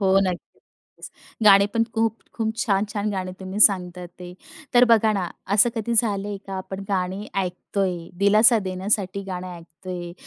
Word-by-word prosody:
हो, 195 Hz, -1 st, +3 dB
नक्कीच 180 Hz, -2 st, -8 dB, 0.4 s
गाणे 200 Hz, -1 st, +7 dB
पण 230 Hz, -, +3 dB
खूप-खूप 225 Hz, 0 st, -2 dB
छान-छान 210 Hz, -3 st, -1 dB
गाणे 185 Hz, -2 st, -4 dB
तुम्ही 190 Hz, +2 st, -5 dB
सांगता 180 Hz, -3 st, +3 dB
ते. 180 Hz, 0 st, -9 dB, 0.4 s
तर 245 Hz, +1 st, +7 dB
बघा 220 Hz, -2 st, +4 dB
ना, 185 Hz, -4 st, -2 dB, 0.3 s
असं 215 Hz, +3 st, +5 dB
कधी 230 Hz, +1 st, -2 dB
झालंय 205 Hz, -3 st, 0 dB
का 195 Hz, -, -6 dB
आपण 190 Hz, +1 st, -6 dB
गाणी 190 Hz, +1 st, -2 dB, 0.2 s
ऐकतोय, 185 Hz, +1 st, -3 dB, 0.2 s
दिलासा 215 Hz, +4 st, +5 dB
देण्यासाठी 190 Hz, +1 st, -2 dB
गाणे 180 Hz, 0 st, -5 dB
ऐकतोय, 175 Hz, +1 st, -8 dB
195 Hz, 140 wpm, -23 LUFS, 185-215 Hz, 0.4 s, गाणे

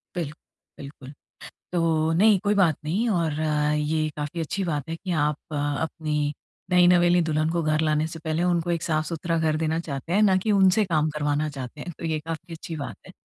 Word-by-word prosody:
Bill 160 Hz, -4 st, -2 dB, 0.5 s
बिल्कुल। 140 Hz, -1 st, -10 dB, 0.6 s
तो, 165 Hz, -2 st, +1 dB
नहीं, 205 Hz, +3 st, +5 dB
कोई 205 Hz, +1 st, +2 dB
बात 175 Hz, -7 st, +3 dB
नहीं 190 Hz, +10 st, 0 dB
और 170 Hz, -6 st, +1 dB, 0.5 s
ये 155 Hz, +1 st, 0 dB
काफ़ी 150 Hz, +3 st, -4 dB
अच्छी 190 Hz, +5 st, -2 dB
बात 150 Hz, -5 st, -3 dB
है 165 Hz, -, -2 dB
कि 185 Hz, +2 st, -6 dB
आप 150 Hz, 0 st, 0 dB, 0.5 s
अपनी 150 Hz, -2 st, -2 dB, 0.4 s
नई-नवेली 175 Hz, 0 st, +5 dB
दुल्हन 155 Hz, -1 st, 0 dB
को 170 Hz, 0 st, 0 dB
घर 155 Hz, 0 st, +1 dB
लाने 155 Hz, 0 st, +1 dB
से 165 Hz, 0 st, -8 dB
पहले 160 Hz, +1 st, -1 dB
उनको 175 Hz, -1 st, +1 dB
एक 170 Hz, -1 st, -1 dB
साफ-सुथरा 165 Hz, +1 st, -1 dB
घर 160 Hz, -1 st, +1 dB
देना 160 Hz, 0 st, 0 dB
चाहते 155 Hz, 0 st, -5 dB
हैं, 205 Hz, -, +4 dB
ना 195 Hz, -3 st, +5 dB
कि 215 Hz, +3 st, 0 dB
उनसे 195 Hz, +1 st, +4 dB
काम 155 Hz, -3 st, +1 dB
करवाना 150 Hz, 0 st, -1 dB
चाहते 140 Hz, +1 st, -8 dB
हैं, 175 Hz, -, -6 dB
तो 165 Hz, -, -5 dB
ये 155 Hz, -1 st, -1 dB
काफ़ी 165 Hz, +2 st, -7 dB
अच्छी 165 Hz, 0 st, -7 dB
बात 145 Hz, -2 st, -5 dB
है। -, -, -11 dB
160 Hz, 195 wpm, -25 LUFS, 155-175 Hz, 0.6 s, नहीं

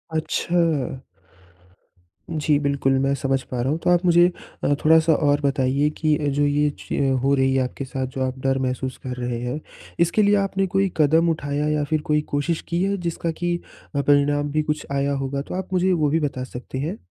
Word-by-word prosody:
अच्छा। 160 Hz, -4 st, 0 dB, 1.3 s
जी, 150 Hz, -2 st, +1 dB
बिल्कुल, 140 Hz, -2 st, +1 dB
मैं 135 Hz, +1 st, +1 dB
समझ 135 Hz, -1 st, 0 dB
पा 125 Hz, -, -5 dB
रहा 130 Hz, -, 0 dB
हूँ 155 Hz, -, 0 dB
तो -, -, +2 dB
आप 175 Hz, +1 st, +3 dB
मुझे 175 Hz, 0 st, +6 dB, 0.4 s
अ, 145 Hz, -, +3 dB
थोड़ा-सा 160 Hz, +1 st, +5 dB
और 145 Hz, -1 st, +2 dB
बताइए 140 Hz, 0 st, +1 dB
कि 155 Hz, -1 st, +2 dB
अ, 145 Hz, -, -2 dB
जो 145 Hz, +1 st, +1 dB
ये 145 Hz, +1 st, +2 dB
च 135 Hz, -1 st, 0 dB
हो 140 Hz, -, +3 dB
रही 135 Hz, -1 st, +2 dB
है 130 Hz, -, +3 dB
आपके 130 Hz, +2 st, -5 dB
साथ, 130 Hz, 0 st, -3 dB
जो 130 Hz, +1 st, -6 dB
आप 130 Hz, 0 st, -4 dB
डर 135 Hz, 0 st, +1 dB
महसूस 130 Hz, 0 st, -2 dB
कर 125 Hz, -1 st, -4 dB
रहे 120 Hz, -1 st, -3 dB
हैं। 125 Hz, +5 st, -3 dB, 0.4 s
इसके 170 Hz, +5 st, +3 dB
लिए 205 Hz, +1 st, +4 dB
आपने 195 Hz, -1 st, 0 dB
कोई 195 Hz, -1 st, +2 dB
कदम 160 Hz, +2 st, +4 dB
उठाया 145 Hz, -1 st, -1 dB
या 150 Hz, -1 st, +1 dB
फिर 155 Hz, +1 st, -1 dB
कोई 150 Hz, -, +3 dB
कोशिश 150 Hz, +3 st, 0 dB
की 170 Hz, +2 st, 0 dB
है 200 Hz, +1 st, 0 dB
जिसका 165 Hz, 0 st, -2 dB
कि 175 Hz, +1 st, -2 dB, 0.4 s
अ, 140 Hz, -, +2 dB
परिणाम 145 Hz, 0 st, +2 dB
भी 155 Hz, +1 st, +1 dB
कुछ 150 Hz, 0 st, -2 dB
आया 140 Hz, 0 st, 0 dB
होगा 140 Hz, +1 st, -2 dB
तो 150 Hz, -, -7 dB
आप 190 Hz, 0 st, -4 dB
मुझे 185 Hz, +1 st, +2 dB
वो 155 Hz, -5 st, +2 dB
भी 160 Hz, +3 st, +2 dB
बता 140 Hz, -4 st, -2 dB
सकते 130 Hz, +1 st, -7 dB
हैं? 160 Hz, +10 st, -3 dB
145 Hz, 210 wpm, -23 LUFS, 135-165 Hz, 1.3 s, मुझे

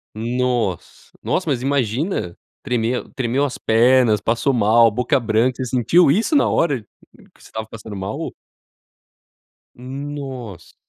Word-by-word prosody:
Nossa, 120 Hz, -4 st, -2 dB
nossa 180 Hz, -3 st, -1 dB
mas 130 Hz, -4 st, 0 dB
imagina, 135 Hz, -, -1 dB, 0.2 s
tremer 120 Hz, 0 st, -1 dB
tremeu 130 Hz, +1 st, 0 dB
as 135 Hz, -, -4 dB
pernas, 115 Hz, -1 st, +4 dB
passou 115 Hz, +6 st, 0 dB
mal 115 Hz, 0 st, +5 dB
a -, -, +1 dB
boca 125 Hz, +4 st, +1 dB
branca, 115 Hz, +3 st, +1 dB
você -, -, -3 dB
sentiu 130 Hz, +7 st, +3 dB
isso 220 Hz, -, +1 dB
na 285 Hz, -, +4 dB
hora 145 Hz, -8 st, +1 dB, 0.5 s
que -, -, -24 dB
você -, -, -15 dB
estava 110 Hz, 0 st, -6 dB
passando 110 Hz, -1 st, -9 dB
mal? 95 Hz, 0 st, -5 dB, 1.4 s
Nossa. 130 Hz, -7 st, -7 dB
125 Hz, 130 wpm, -20 LUFS, 110-135 Hz, 1.4 s, mal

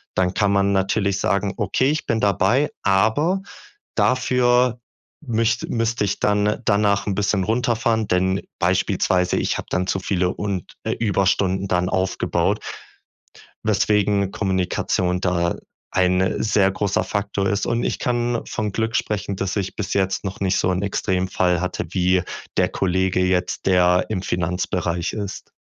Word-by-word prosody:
Dann 90 Hz, 0 st, +1 dB
kann 105 Hz, 0 st, +2 dB
man 100 Hz, 0 st, +2 dB
natürlich 100 Hz, +1 st, +1 dB
sagen: 100 Hz, +1 st, 0 dB
„Okay, 120 Hz, +6 st, +1 dB
ich 155 Hz, -, -2 dB
bin 115 Hz, -, 0 dB
dabei, 105 Hz, -, +2 dB
aber 110 Hz, -, +2 dB, 0.6 s
dafür 125 Hz, -1 st, +2 dB, 0.5 s
müsst 115 Hz, -1 st, 0 dB
müsste 115 Hz, -1 st, 0 dB
ich 100 Hz, -, -2 dB
dann 105 Hz, 0 st, +1 dB
danach 100 Hz, -1 st, +2 dB
'n 100 Hz, -, 0 dB
bisschen 100 Hz, -1 st, 0 dB
runterfahren, 115 Hz, 0 st, +1 dB
denn 95 Hz, +1 st, +1 dB, 0.2 s
beispielsweise 90 Hz, -1 st, +1 dB
ich -, -, 0 dB
habe -, -, -6 dB
dann 90 Hz, 0 st, 0 dB
zu 95 Hz, -, 0 dB
viele 95 Hz, -1 st, 0 dB
und 100 Hz, -4 st, -4 dB
äh, -, -, -1 dB
Überstunden 100 Hz, -2 st, +1 dB
dann 90 Hz, 0 st, +1 dB
aufgebaut." 95 Hz, 0 st, 0 dB, 1.0 s
Weswegen 105 Hz, -1 st, +2 dB
Kommunikation 90 Hz, -1 st, -1 dB
da 85 Hz, -2 st, 0 dB, 0.4 s
ein 90 Hz, 0 st, +1 dB
sehr 100 Hz, -3 st, +3 dB
großer 100 Hz, 0 st, 0 dB
Faktor 100 Hz, -1 st, -1 dB
ist. 100 Hz, +1 st, 0 dB
Und 120 Hz, 0 st, 0 dB
ich -, -, -2 dB
kann 120 Hz, -1 st, 0 dB
von 105 Hz, -1 st, -2 dB
Glück 115 Hz, +1 st, -1 dB
sprechen, 100 Hz, -2 st, -2 dB
dass 95 Hz, 0 st, -2 dB
ich 100 Hz, -3 st, -3 dB
bis 105 Hz, -, -3 dB
jetzt 95 Hz, 0 st, 0 dB
noch 95 Hz, 0 st, -5 dB
nicht 95 Hz, -2 st, +1 dB
so 95 Hz, -, +1 dB
'n 90 Hz, +1 st, -1 dB
Extremfall 95 Hz, -3 st, 0 dB
hatte 90 Hz, -1 st, -3 dB
wie 90 Hz, 0 st, +2 dB, 0.3 s
der -, -, +3 dB
Kollege 95 Hz, 0 st, 0 dB
jetzt, 90 Hz, -1 st, -1 dB
der 90 Hz, -1 st, +4 dB
im 100 Hz, -4 st, -2 dB
Finanzbereich 90 Hz, -1 st, -1 dB
ist. 100 Hz, -2 st, -6 dB
100 Hz, 145 wpm, -22 LUFS, 90-105 Hz, 1.0 s, der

